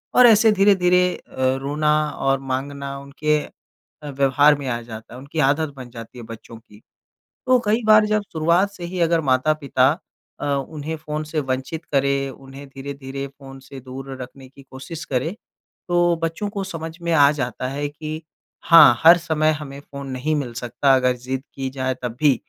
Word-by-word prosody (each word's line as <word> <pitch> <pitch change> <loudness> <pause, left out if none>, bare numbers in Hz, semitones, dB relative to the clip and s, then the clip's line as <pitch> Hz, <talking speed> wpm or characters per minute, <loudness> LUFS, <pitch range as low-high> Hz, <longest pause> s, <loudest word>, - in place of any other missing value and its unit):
और 250 - +8
ऐसे 220 0 +6
धीरे-धीरे 185 -3 +4
अ, - - -17 0.3
रोना 150 +2 0 0.2
और 135 -1 0
माँगना 140 +1 -4
उनके 150 +2 -1 0.7
अ, 145 - -6
व्यवहार 140 +2 +4
में 135 - -5
आ 120 -1 -2
जाता 115 0 -10
है। - - -9
उनकी 140 +4 -6
आदत 145 0 -1
बन 125 -2 -9
जाती 115 +1 -11
है 120 - -8
बच्चों 115 0 -11
की। 110 -2 -19 0.7
तो 255 0 +5
कई 220 +3 +1
बार 215 0 +7
जब 215 0 +1
शुरुआत 170 +5 +2
से 180 -3 -9
ही 180 +1 -4
अगर 165 0 +3
माता-पिता 135 -1 +2 0.5
अ, - - -4
उन्हें 145 +3 -3
फ़ोन 155 0 -5
से 155 0 -2
वंचित 135 +4 -4
करें, 140 0 +1
उन्हें 135 +2 -12
धीरे-धीरे 135 0 -7
फ़ोन 135 -1 -13
से 135 0 -11
दूर 135 +1 -9
रखने 130 +1 -11
की 135 +1 -17
कोशिश 135 +5 -9
करें, 135 +8 -2 0.5
तो 175 -1 +3
बच्चों 165 +6 -2
को 200 -1 -4
समझ 165 -3 -7
में 170 0 -1
आ 145 -2 +6
जाता 130 -2 -3
है 145 +2 -3
कि 155 +2 -7 0.4
हाँ, 150 -8 +8
हर 170 +2 +9
समय 155 -2 +1
हमें 145 -2 -7
फ़ोन 140 -1 -9
नहीं 135 +5 -1
मिल 130 -5 -3
सकता 125 +3 +1
अगर 125 -1 +2
ज़िद 130 +2 -4
की 135 -1 -3
जाए 130 -1 -2
तब 120 -2 -3
भी। 145 -3 +5
140 Hz, 180 wpm, -22 LUFS, 130-160 Hz, 0.7 s, हर